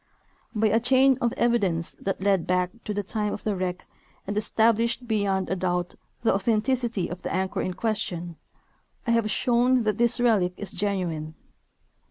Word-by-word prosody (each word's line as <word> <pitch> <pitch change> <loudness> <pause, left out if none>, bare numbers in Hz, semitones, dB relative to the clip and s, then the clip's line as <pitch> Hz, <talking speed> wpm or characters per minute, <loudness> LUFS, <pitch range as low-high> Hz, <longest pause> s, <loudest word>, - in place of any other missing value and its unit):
By 215 0 +3
a 225 - +3
chain 260 +2 +4
of 235 - +2
evidence 200 -10 +1
that 195 -1 -3
led 195 -4 +2
back 180 0 +1
to 215 - -3
the 205 0 -2
time 210 +1 -2
of - - -7
the 210 -2 0
wreck 180 -1 -3 0.4
aiid 205 - -3
established 230 +3 +2
beyond 200 -4 0
a 190 - -1
doubt 180 -1 -1 0.3
the 225 - +4
authenticit}^ 225 0 0
of 180 - -6
the - - -4
anchor 190 0 -1
in 185 - -3
question, 175 -6 -2 0.7
I 235 - +1
have 230 -2 +2
shown 245 +2 +2
that 215 -1 -1
this 240 0 +2
relic 210 -7 +3
is 205 - -3
genuine. 175 -6 -2
205 Hz, 170 wpm, -26 LUFS, 185-230 Hz, 0.7 s, chain